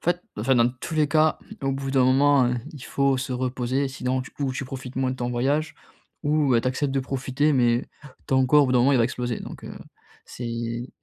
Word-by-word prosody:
fait 175 +1 +1 0.2
enfin, 125 +5 +2
dans 120 +1 +4
tous 165 - -5
les 155 -1 +3
cas, 155 +1 +2 0.2
au 135 - +1
bout 135 0 -3
d'un 130 -2 +4
moment, 135 0 +4
heu, 125 - 0 0.2
il 140 -4 -10
faut 140 -1 +1
se 130 0 -3
reposer. 130 +2 -1
Sinon, 130 -1 -2
du 125 - -8
coup, 135 -3 -3
tu 135 - -4
profites 130 -1 -8
moins 130 -1 +1
de - - -7
ton 120 0 -3
voyage. 140 +6 0 0.5
Ou 145 -5 +3
tu - - -5
acceptes 135 +1 -1
de 135 - +2
profiter, 135 +3 0
mais 120 -2 +2 0.4
ton 130 -1 +3
corps, 145 +2 +5
au - - 0
bout 130 - 0
d'un 125 - +4
moment 135 +3 +4
il 130 - +4
va - - +4
exploser. 125 -1 -3
Donc, - - -9
heu, - - -8 0.5
c'est 120 0 -5
130 Hz, 230 wpm, -24 LUFS, 125-140 Hz, 0.5 s, corps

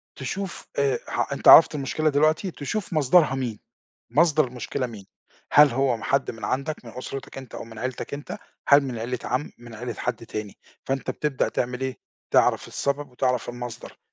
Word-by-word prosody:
تشوف 185 +8 -5
آآ، 140 -1 +2
ح - - -2
أنت - - -2
عرَفت 160 - +10
المشكلة 150 +2 0
دلوقتي 155 +6 +2
تشوف 180 +7 -4
مصدَرها 150 -1 +4
مين، 120 -5 -3 0.5
مصدَر 155 -1 +4
المشكلة 125 +1 -3
مين، 105 -5 -10 0.5
هل 150 0 +8
هو 125 -2 0
حَد 140 +4 +1
من 110 -3 -8
عَندك 140 +6 -2
من 115 - -9
أُسرتك 135 +1 -7
أنت 130 -2 -10
أو - - -6
من 115 -1 -12
عيلتك 130 +3 -4
أنت، 145 0 -7 0.3
هل 140 0 +8
من 130 -4 -4
عيلة 120 +2 -3
عَم، 130 +4 -2
من 120 -1 -12
عيلة 120 +1 -5
حَد 115 0 -4
تاني، 105 -2 -6 0.3
فأنت 135 0 -2
بتبدأ 150 -3 -1
تعمل 125 +1 -2
إيه، 130 -1 -3 0.3
تعرَف - - +3
السبب 140 0 -2
وتعرَف 125 -1 -1
المصدَر، 120 -1 -7
130 Hz, 175 wpm, -25 LUFS, 120-145 Hz, 0.5 s, عرَفت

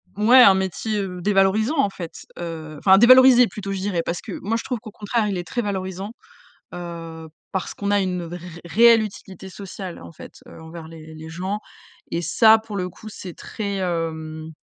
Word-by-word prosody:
mouais, 230 +6 +6
un 195 -5 +8
métier, 190 +3 -2
heu, 180 -2 -6
dévalorisant 210 - +2
en 275 -7 +3
fait, 165 -4 -9
heu, 160 -2 -6
enfin 190 +3 +6
dévalorisé 255 +2 +8
plutôt, 200 -2 -6
je 195 - -3
dirais. 185 -3 -1
Parce 170 +1 -4
que - - -9
moi, 225 +3 -1
je - - -5
trouve 250 -3 -3
qu'au 215 - -10
contraire, 215 +2 -1
il 200 -2 -2
est 175 - -5
très 240 - -2
valorisant, 190 -1 -4 0.6
heu, 165 -2 -8 0.3
parce 190 -2 -3
qu'on 200 - -4
a 205 0 +3
une 180 -2 -2
ré 170 +1 -7 0.3
réelle 230 +5 +6
utilité 190 -2 -9
sociale 190 -1 -8
en 85 0 -11
fait, - - -12
heu, - - -13
envers 160 0 -10
les 160 -1 -12
les 160 +1 -10
gens. 185 +5 -4 0.5
Et 170 - -1
ça 220 +7 +5
pour 220 -1 -9
le 180 -2 -2
coup, 200 +5 -14
c'est 185 -4 -9
très, 200 +2 -5
hem, 160 -3 -3
190 Hz, 195 wpm, -22 LUFS, 170-210 Hz, 0.6 s, un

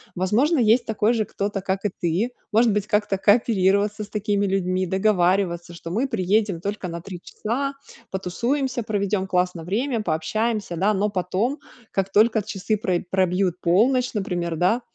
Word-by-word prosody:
возможно, 230 - +2
есть 235 +1 +4
такой 220 0 +1
же 220 -2 0
кто-то, 200 0 -3
как 195 0 -2
и - - +3
ты, 180 +8 0 0.2
может 225 +1 +4
быть 210 0 -1
как-то 210 -2 +1
кооперироваться 205 0 +2
с - - -21
такими 205 -1 0
людьми, 185 -1 0
договариваться, 180 -2 +1
что 170 0 -8
мы 235 +9 0
приедем 205 -4 0
только 200 0 -4
на 170 -1 -6
3 180 0 -8
часа, 270 +9 -3 0.4
потусуемся, 245 +7 -2
проведём 200 -2 -1
классно 180 -2 0
время, 230 - -1
пообщаемся, 210 +4 -1
да, 195 +5 +2
но 205 +1 +1
потом, 200 +8 -1 0.3
как 195 0 -1
только 220 +2 +4
часы 210 +1 -2
про 185 -4 0
пробьют 185 -1 +1
полночь, 245 +9 +2
например, 175 -5 -2
да, 190 +9 +2
200 Hz, 155 wpm, -23 LUFS, 185-220 Hz, 0.4 s, есть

